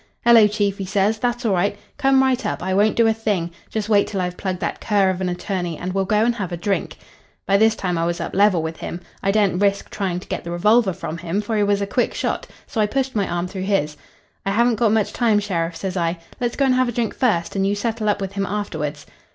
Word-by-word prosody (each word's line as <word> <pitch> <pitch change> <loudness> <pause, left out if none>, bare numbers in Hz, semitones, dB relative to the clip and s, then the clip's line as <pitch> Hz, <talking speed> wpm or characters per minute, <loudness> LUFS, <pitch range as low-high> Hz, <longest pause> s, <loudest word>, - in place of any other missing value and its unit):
"'Hello, 230 -3 +8
chief,' 205 -1 -1
he 195 - -3
says. 205 +2 +1
'That's 240 +1 -1
all 210 - +2
right. 200 +3 +1 0.2
Come 270 -1 +4
right 260 -2 +1
up. - - -3
I 190 +1 -1
won't 205 +3 +3
do 230 - +4
a 225 - +4
thing. 205 -6 -1 0.2
Just 215 -2 -3
wait 205 -2 +3
till 200 - -3
I've 180 -1 -2
plugged 185 -1 -3
that 170 - -3
cur 200 -3 +2
of 185 0 -5
an 185 - 0
attorney 175 -2 -3
and 180 +1 -4
we'll 195 0 0
go 210 +3 +2
and 240 - +2
have 195 -6 -4
a 175 - -3
drink.' 195 +3 -2 0.5
"By 195 - +3
this 220 +1 +4
time 180 -5 -2
I 165 - +1
was 175 0 -2
up - - -4
level 195 -4 +4
with 160 0 -4
him. 170 - -6 0.2
I 195 - 0
daren't 200 -2 +2
risk 200 -1 +1
trying 185 -3 -2
to - - -13
get - - -4
the 170 - -7
revolver 210 +5 +3
from 170 -2 -6
him, 175 +3 -2
for 210 +2 -2
he 210 - +2
was 205 0 +2
a - - 0
quick 240 +5 0
shot, - - -2 0.2
so 220 - -2
I 210 - +3
pushed 265 +2 -2
my 200 -2 +1
arm 175 +1 -2
through 190 0 -5
his. 150 -7 +1 0.5
"'I - - -1
haven't 235 +4 +3
got 225 -1 +3
much 220 -2 +1
time, 230 -4 +2
sheriff,' 170 -5 -2
says 190 0 -4
I. 170 -1 0 0.2
'Let's 240 -1 -1
go 275 - +2
and 260 - +3
have 255 -1 +2
a - - -1
drink 235 -2 -1
first, 205 -10 0
and 195 0 +1
you 200 - +1
settle 220 +1 -1
up 205 -1 0
with 195 -1 -3
him 200 -1 -2
afterwards.' 155 -8 -4
200 Hz, 265 wpm, -21 LUFS, 180-220 Hz, 0.5 s, Hello